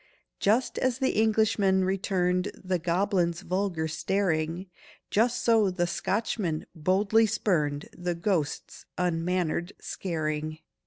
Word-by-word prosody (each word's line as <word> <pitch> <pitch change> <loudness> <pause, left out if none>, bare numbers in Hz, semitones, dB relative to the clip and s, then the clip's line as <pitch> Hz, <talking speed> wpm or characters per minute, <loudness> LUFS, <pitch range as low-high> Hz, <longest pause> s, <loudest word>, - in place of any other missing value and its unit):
Just 225 +6 +2
as 255 -2 +1
the 260 0 +1
Englishman 210 -3 +2
returned 185 -1 0
The 185 -1 -2
goblin's 175 0 +1
vulgar 185 -4 -1
staring, 165 0 -1 0.5
Just 235 +2 +2
so 225 -4 +4
the 180 -1 0
Scotchman 175 -1 -1
boldly 195 +7 +3
spurned 155 -9 0
The 175 0 -2
ghost's 170 -4 -2
unmannered 175 0 0
scaring. 155 -3 -3
185 Hz, 105 wpm, -28 LUFS, 170-205 Hz, 0.5 s, so